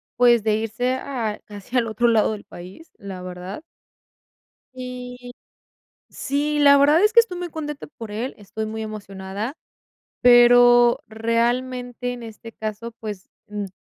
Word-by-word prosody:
pues, 240 -2 +5
de 215 -1 +2
irse 225 +3 -1
a 250 -5 -4
casi 205 +4 -10
al 240 -2 +2
otro 235 +2 +1
lado 225 -2 +3
del 210 -1 -7
país, 185 - -12
la 190 -2 -8
verdad 180 - -7 1.1
y, 250 -1 -8 0.8
sí, 295 +2 -1
la 280 -1 +7
verdad 295 +6 +5
es 425 +1 +3
que 470 - +8
estoy 415 -6 +1
muy 355 -1 -5
contenta 295 -2 -6
por 225 -2 -8
él, 230 +5 -4
estoy 215 +1 -6
muy 220 +1 -5
emocionada, 205 +1 -6 0.7
pero 240 0 +7
realmente, 245 +2 -1
en 245 -1 -8
este 225 0 -10
caso, 220 +2 -6
pues, 210 -4 -7 0.2
mm, 210 -1 -4
235 Hz, 145 wpm, -22 LUFS, 215-255 Hz, 1.1 s, que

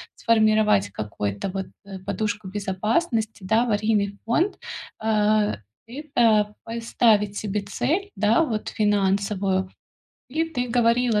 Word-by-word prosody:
сформировать 215 - +3
какой-то 105 - -4
вот, 190 0 -4 0.2
э, 195 -1 -8
подушку 205 +1 -3
безопасности, 215 - -1
да, 220 +5 +3
аварийный 210 -3 0
фонд, 330 - +1 0.4
а, 215 -1 +2 0.3
и 260 +5 -7
так, 215 -4 +4
поставить 225 -3 +1
себе 205 -1 -2
цель, 330 - -1
да, 215 +8 +3
вот 225 -9 -2
финансовую? 200 -2 +1 0.6
И 320 +4 0
ты 250 -7 -3
говорила, 235 -1 +2
215 Hz, 115 wpm, -24 LUFS, 200-230 Hz, 0.6 s, так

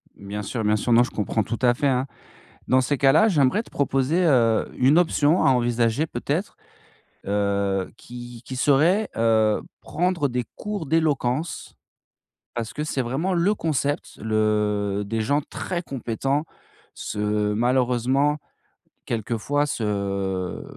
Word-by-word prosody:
Bien 100 +1 -6
sûr, 115 +3 -3
bien 105 0 +3
sûr 115 +3 0
non 120 +1 +6
je - - -4
comprends 110 +1 -1
tout 115 +3 -4
à 120 -1 +5
fait, 140 +3 0
hein. 130 -1 +1 0.6
Dans 130 - +4
ces 140 +3 0
cas-là, 145 +10 +5
j'aimerais 155 - +2
te - - -19
proposer, 140 +5 +1
heu, 115 -7 +3
une 135 +5 +4
option 160 -1 +3
à - - +5
envisager. 120 +3 +1
Peut-être, 150 - -3 0.7
heu, 100 -1 0
qui 120 -1 -10
qui 130 - -7
serait, 160 +11 +3
heu, 110 -2 +3 0.2
prendre 175 -3 0
des 125 -1 -2
cours 205 -7 -5
d'éloquence. 150 -1 -1 0.8
Parce 115 -2 -4
que 150 - -3
c'est 140 - -2
vraiment 140 +10 -1
le 180 +5 +2
concept, 145 -5 -2
le 105 -2 0
des 110 +1 -1
gens 145 +6 +1
très 175 +4 -5
compétents, 135 +2 -2 0.5
se 105 0 -1
malheureusement, 125 +4 +2 0.7
quelquefois 115 +6 -1
se 100 -6 -2
125 Hz, 135 wpm, -24 LUFS, 110-145 Hz, 0.8 s, non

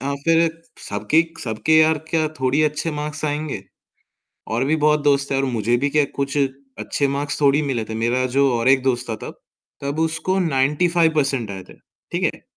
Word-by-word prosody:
हाँ, 140 +2 -2
फिर 165 0 +4 0.4
सबके 105 +11 +2 0.2
सबके 110 +7 -1
यार 155 0 +4
क्या 160 -2 +1
थोड़ी 130 +4 +2
अच्छे 150 +2 0
मार्क्स 150 0 -4
आएँगे? 150 -7 -3 0.9
और 115 +4 0
भी 155 +3 +1
बहुत 150 -1 +2
दोस्त 140 -1 +2
है - - +1
और 135 - +1
मुझे 120 -2 0
भी 140 - +1
क्या 150 0 +3
कुछ 140 0 -2 0.4
अच्छे 140 - -1
मार्क्स 140 +2 -1
थोड़ी 145 +1 +4
मिले 130 -6 -2
थे 110 - -5
मेरा 120 +3 0
जो 140 -1 +4
और 115 +2 +1
एक 135 -1 +4
दोस्त 125 -3 -1
था - - -1
तब, - - -10 0.4
तब 140 +2 -3
उसको 160 +4 0
95% 150 - +1
आये 95 -1 -6
थे - - -18 0.4
ठीक - - -2
है। - - -17
140 Hz, 185 wpm, -21 LUFS, 130-155 Hz, 0.9 s, फिर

